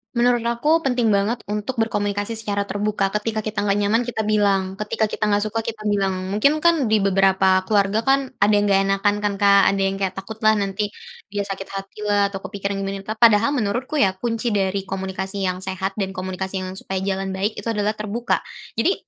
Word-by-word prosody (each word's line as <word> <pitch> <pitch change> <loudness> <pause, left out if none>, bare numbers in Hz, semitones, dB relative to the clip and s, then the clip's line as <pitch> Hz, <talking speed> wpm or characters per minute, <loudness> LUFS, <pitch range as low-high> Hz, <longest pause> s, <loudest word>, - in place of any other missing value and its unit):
Menurut 240 0 +2
aku 235 +7 +2
penting 245 -4 +2
banget 210 +3 +1
untuk 210 +4 -2
berkomunikasi 205 0 -1
secara 205 -2 -1
terbuka, 205 0 0
ketika 215 +1 -2
kita 215 -1 -3
nggak 200 0 +2
nyaman 210 +3 +2
kita 235 -2 -2
bilang, 200 -3 +1
ketika 210 +1 -1
kita 210 - -2
nggak 205 -1 +2
suka 225 +1 -3
kita 225 -2 -5
bilang, 190 -2 -1
mungkin 280 +10 +2
kan 335 -5 +3
di 215 -2 +2
beberapa 190 -1 +3
keluarga 205 +2 +1
kan 270 0 +2
ada 205 +2 +3
yang 205 0 +3
nggak 195 0 +4
enakan 205 +1 +1
kan 205 - +1
Kak, 200 0 +6
ada 195 - -1
yang 195 0 0
kayak 195 -1 -1
takut 195 +3 -8
lah 215 - +7
nanti, 205 0 -2 0.4
dia 205 - 0
sakit 195 -1 -5
hati 195 +2 -7
lah 205 -1 +2
atau 195 - -5
kepikiran 200 -1 -3
gimana 195 0 -3
lah, 215 +3 -5
padahal 225 +1 +5
menurutku 245 +6 -1
ya 195 -9 +3
kunci 230 +3 -2
dari 195 -1 0
komunikasi 190 0 -3
yang 185 +1 -4
sehat 190 +1 -3
dan 195 -2 -2
komunikasi 190 0 -3
yang 185 0 -6
supaya 190 -1 -3
jalan 195 0 -2
baik 200 +3 -2
itu - - -6
adalah 210 0 -1
terbuka, 215 +3 -1 0.4
jadi 335 - +3
205 Hz, 200 wpm, -22 LUFS, 195-220 Hz, 0.4 s, lah